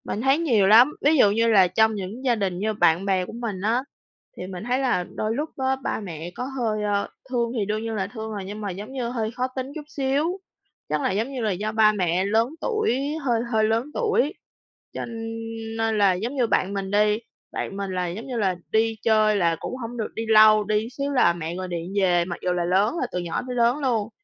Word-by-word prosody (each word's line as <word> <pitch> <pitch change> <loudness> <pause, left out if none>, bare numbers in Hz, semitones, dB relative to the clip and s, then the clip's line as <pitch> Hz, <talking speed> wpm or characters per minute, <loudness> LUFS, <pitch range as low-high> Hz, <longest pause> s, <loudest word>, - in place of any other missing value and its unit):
Mình 210 - -4
thấy 270 +3 +3
nhiều 230 -12 +3
lắm, 240 +8 +7
ví 300 +2 +4
dụ 205 -6 +6
như 230 +2 +2
là 200 -5 +6
trong 220 +4 +2
những 205 +7 -6
gia 245 -2 +3
đình 190 -4 -2
như 215 +2 0
bạn 180 -2 +3
bè 190 -2 +1
của 220 - -10
mình 225 -5 -4
á, 230 +5 +1 0.5
thì 180 - -6
mình 185 0 -7
thấy 250 +3 0
là 250 -9 +1
đôi 215 +1 -1
lúc 300 +4 -2
á 265 0 +1
ba - - -1
mẹ 175 -4 -7
có - - -4 0.2
hơi, 215 -3 -1
ơ, 205 -1 0 0.2
thương 235 -2 0
thì 210 - 0
đương 215 +2 -2
nhiên 225 -1 -3
là 190 -3 -1
thương 220 0 -7
rồi, 200 -2 -5
nhưng 205 +2 -7
mà 205 - -3
giống 205 +6 -8
như 250 -3 -2
hơi 225 -3 -2
khó 250 +2 -2
tính 260 +1 -4
chút 310 - -6
xíu. 295 +5 -1 0.5
Chắc 150 0 0
là - - 0
giống 220 +7 -1
như 255 - -3
là 215 -2 +1
do 205 +4 -2
ba 220 -1 +5
mẹ 185 -2 0
lớn 225 +4 +2
tuổi, 435 - 0 0.2
hơi 235 -4 +1
hơi 220 -1 +2
lớn 225 +3 +1
tuổi, 435 - +1 0.6
cho - - -4 0.7
nên 225 -1 0
là 200 -2 +4
giống 225 +9 -3
như 250 -4 +2
bạn 195 -2 +1
mình 195 -1 -3
đi, 210 +1 +3 0.3
bạn 195 - -4
mình 200 -1 -3
là 180 -1 -1
giống 190 +9 -6
như 250 -3 -4
là 190 -4 +1 0.2
đi 225 +1 +2
chơi 215 -1 +4
là 170 -4 +2
cũng - - -5
hổng 240 -1 -6
được 220 - -4
đi 225 - -3
lâu, 215 -1 +7
đi 215 +2 0
xíu 280 +1 -3
là 245 -11 +4
mẹ 170 0 -5
gọi 185 0 -4
điện 175 +1 -5
về, 175 -2 +3
mặc 175 -1 -5
dù 180 - +1
là 175 -1 -1
lớn 195 - +2
rồi, 255 - -1
từ 180 - -2
nhỏ 175 -2 -3
tới 250 - -4
lớn 240 +2 +3
luôn. 230 -7 0
215 Hz, 245 wpm, -24 LUFS, 195-245 Hz, 0.7 s, lắm